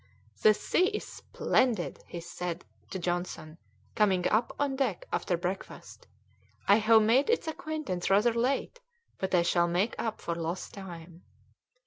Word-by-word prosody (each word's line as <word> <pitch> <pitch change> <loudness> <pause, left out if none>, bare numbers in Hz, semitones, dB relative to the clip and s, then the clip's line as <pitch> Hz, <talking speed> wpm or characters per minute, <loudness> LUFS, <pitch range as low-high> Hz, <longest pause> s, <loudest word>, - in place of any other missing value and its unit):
"The 215 -1 +6
sea 365 - +2
is 425 - -3
splendid," 220 - 0 0.2
said 175 0 -5
he - - -35
to - - -4
Johnson, 175 -2 -3 0.3
coming 190 -5 +2
up 225 +3 +2
on 285 -2 0
deck 275 - -1
after 175 - 0
breakfast. 180 +3 -6 0.6
"I 200 - +7
have 220 0 +5
made 245 - +3
its 465 -7 +1
acquaintance 310 - -3
rather 210 +5 +4
late, 255 - -1 0.4
but 190 -1 0
I 170 - +4
shall 170 0 +2
make 180 +6 +1
up 225 -2 -2
for 170 - -3
lost 170 +2 -4
time." 175 -3 -10
195 Hz, 145 wpm, -29 LUFS, 175-240 Hz, 0.6 s, I